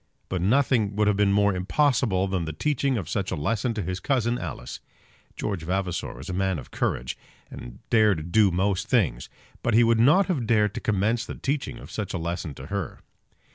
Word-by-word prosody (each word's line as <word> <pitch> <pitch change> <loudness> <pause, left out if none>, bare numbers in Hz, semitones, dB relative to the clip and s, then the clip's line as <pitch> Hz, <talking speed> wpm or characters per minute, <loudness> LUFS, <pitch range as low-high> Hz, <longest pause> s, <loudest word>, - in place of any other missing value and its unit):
But 95 -2 -2
nothing 110 -1 +2
would 105 0 +2
have 105 - +3
been 100 0 +3
more 100 0 +3
impossible 100 0 +1
than 95 -3 -1
the 80 - -4
teaching 135 - 0
of 95 -8 -4
such 95 +1 -2
a - - -2
lesson 115 - -1
to 105 - -2
his 90 +2 -3
cousin 120 +1 0
Alice. - - -6 0.6
George 100 -5 -3
Vavasor 90 -5 -2
was 65 +3 -9
a 90 - -4
man 95 -1 0
of 65 - -10
courage, 65 0 -2 0.4
and - - -9
dared 100 -8 +3
do 105 -1 +5
most 95 +3 0
things; 90 - +1 0.3
but 120 - +1
he 120 - +6
would 115 -1 +3
not 150 +12 +5
have 145 - -1
dared 105 -3 +3
to - - -5
commence 110 +3 +1
the - - -7
teaching 135 -3 -2
of - - -11
such 105 -3 -4
a - - 0
lesson 85 -3 -4
to 65 - -9
her. 100 +1 -4
100 Hz, 205 wpm, -25 LUFS, 90-115 Hz, 0.6 s, he